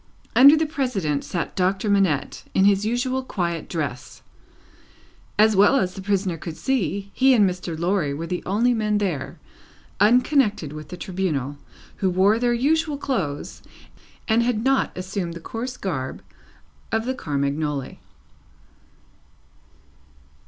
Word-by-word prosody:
Under 280 +4 +8
the 315 - +1
President 245 - -1
sat 170 - -4
Doctor 190 +3 0
Manette, 195 -9 +1
in 190 - +4
his 200 +1 +3
usual 255 +3 0
quiet 170 -9 -3
dress. 145 -7 -5 1.1
As 215 0 +5
well 205 +7 +5
as 185 -9 +1
the 190 - -8
prisoner 190 -3 -1
could 160 0 -7
see, 200 - -1
he 265 0 +4
and 210 -4 +5
Mr. 180 -3 -4
Lorry 170 -3 0
were 150 +4 -4
the 180 +1 -3
only 230 +6 +2
men 210 -2 0
there, 180 -10 -3 0.6
unconnected 220 - +3
with 155 -1 -8
the 180 - -7
Tribunal, 160 -8 -3 0.4
who 190 - +1
wore 195 +5 +3
their 240 0 +2
usual 295 +5 +1
clothes, 180 - -3 0.7
and 225 +1 +3
had 235 -2 0
not 270 +1 +2
assumed 185 -2 -4
the - - -7
coarse 245 +8 -6
garb 130 -9 -4 0.7
of 225 +1 0
the 260 - -1
Carmagnole. 145 - -2
195 Hz, 135 wpm, -23 LUFS, 170-240 Hz, 1.1 s, Under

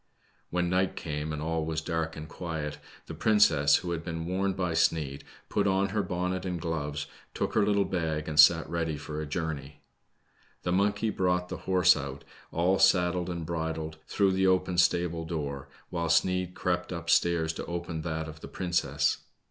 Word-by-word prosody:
When 90 0 0
night 90 +1 +1
came, 75 0 -4
and 75 0 -4
all 80 0 -1
was 80 0 -2
dark 80 0 -2
and 80 0 -7
quiet, 80 -3 -5 0.3
the - - -7
princess, 80 -10 +4
who 85 - -1
had 85 -1 -3
been 80 -1 -4
warned 95 +2 -1
by 90 -3 0
Sneid, 75 -4 +1 0.2
put 100 -1 +1
on 95 0 +2
her 105 +2 0
bonn.et 90 0 -2
and 90 -2 -3
gloves, 75 -3 -3 0.3
took - - -1
her 110 - +3
little 100 -1 +2
bag, 80 -4 -2
and 75 -1 -1
sat 80 +2 +7
ready 80 -2 -2
for 75 +1 -5
a 75 - -5
journey. 75 -3 -4 0.8
The 90 - -1
monkey 100 +3 +1
brought 90 -2 0
the 90 - -4
horse 90 -2 +6
out, 70 0 -6 0.3
all 90 +3 +2
saddled 90 -2 +3
and 85 -2 -4
bridled, 80 -1 -3
through 100 -2 +2
the 95 0 +2
open 90 -1 +2
stable 85 -1 +2
door, 75 -5 -4 0.2
while 85 -2 -1
Sneid 90 +2 +2
crept 90 0 -1
up 85 -1 -5
stairs 85 -1 +3
to - - -6
open 85 -2 -4
that 80 -1 -3
of 80 0 -9
the - - -9
princess. 90 -1 0
85 Hz, 180 wpm, -29 LUFS, 80-90 Hz, 0.8 s, sat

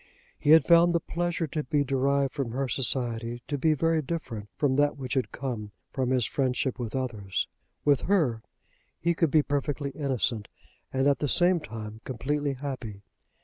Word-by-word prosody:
He - - -1
had 160 +1 +8
found 170 0 +6
the - - +4
pleasure 170 +1 -2
to 150 0 -3
be 145 +2 +1
derived 140 0 +1
from 135 -6 -3
her 135 +1 -1
society 120 -2 -1
to 145 - -1
be 155 +3 +2
very 165 +2 +2
different 130 -9 -5
from 140 -3 +1
that 145 0 +2
which 130 -3 -4
had 130 -2 0
come 115 -6 -5 0.2
from 130 -2 -1
his 130 -3 +2
friendship 130 -1 -1
with 120 -1 -4
others. 110 -7 -2 0.4
With 145 -3 +4
her 145 - +2 0.6
he 170 +1 +2
could 165 -3 +2
be 155 +1 +4
perfectly 140 0 -2
innocent, 130 -6 -1 0.4
and 135 0 +1
at 140 - +3
the 145 - 0
same 175 +2 +4
time 110 -6 -8
completely 145 +3 -1
happy. 125 -7 -6
135 Hz, 175 wpm, -28 LUFS, 125-150 Hz, 0.6 s, had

